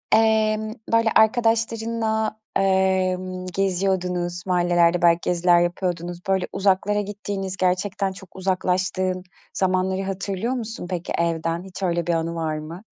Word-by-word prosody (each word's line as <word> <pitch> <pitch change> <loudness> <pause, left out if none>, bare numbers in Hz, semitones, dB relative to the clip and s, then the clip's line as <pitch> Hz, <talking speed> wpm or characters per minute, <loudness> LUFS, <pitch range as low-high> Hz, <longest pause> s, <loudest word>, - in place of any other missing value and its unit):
emm, 220 -1 +2 0.2
böyle, 230 0 +4
arkadaşlarınla, 225 -1 +1 0.2
emm, 185 -1 +1
geziyordunuz, 180 -2 -1
mahallelerde 175 -1 +3
belki 170 0 +5
geziler 175 0 +3
yapıyordunuz. 175 0 -2
Böyle, 190 -1 +1
uzaklara 200 +1 +2
gittiğiniz, 200 -2 -4
gerçekten 190 +1 0
çok 190 -1 -13
uzaklaştığın 185 0 0 0.3
zamanları 190 0 0
hatırlıyor 195 +4 -2
musun 225 -7 -5
peki 180 -2 -3
evden? 165 0 -1
Hiç 190 0 -8
öyle 170 -1 0
bir 170 - +2
anı 165 0 -1
var 160 -2 -2
mı? 165 +6 -8
185 Hz, 120 wpm, -23 LUFS, 175-205 Hz, 0.3 s, belki